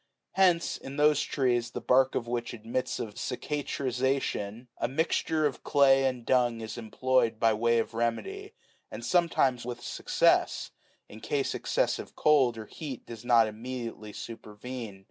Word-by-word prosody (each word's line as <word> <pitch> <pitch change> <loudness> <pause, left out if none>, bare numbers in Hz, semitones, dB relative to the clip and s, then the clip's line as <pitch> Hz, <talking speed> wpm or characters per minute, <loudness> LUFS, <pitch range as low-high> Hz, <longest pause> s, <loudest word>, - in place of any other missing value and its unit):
Hence, 180 -3 +3
in 135 +2 -9
those 150 -1 +4
trees 120 -4 0
the - - -5
bark 130 +1 +3
of 120 - -1
which 120 0 -3
admits 115 +3 -3
of 105 - -5
cicatrization, 130 -5 -2
a - - +1
mixture 160 +1 0
of 145 - -2
clay 135 -1 +5
and 125 -3 -2
dung13 120 -3 +2
is 110 - -6
employed 120 0 0
by 115 -1 +4
way 115 +2 +2
of 115 - -1
remedy; 255 - -3 0.3
and - - -7
sometimes 165 -8 +2
with 120 0 -6
success, - - +1 0.4
in 110 - -12
case 140 +4 -1
excessive - - -1
cold 135 -6 +4
or 110 - -6
heat 135 +1 -7
does 115 -1 -9
not 120 -2 +5
immediately 115 -1 -6
supervene. 115 0 -8
125 Hz, 145 wpm, -29 LUFS, 115-135 Hz, 0.4 s, clay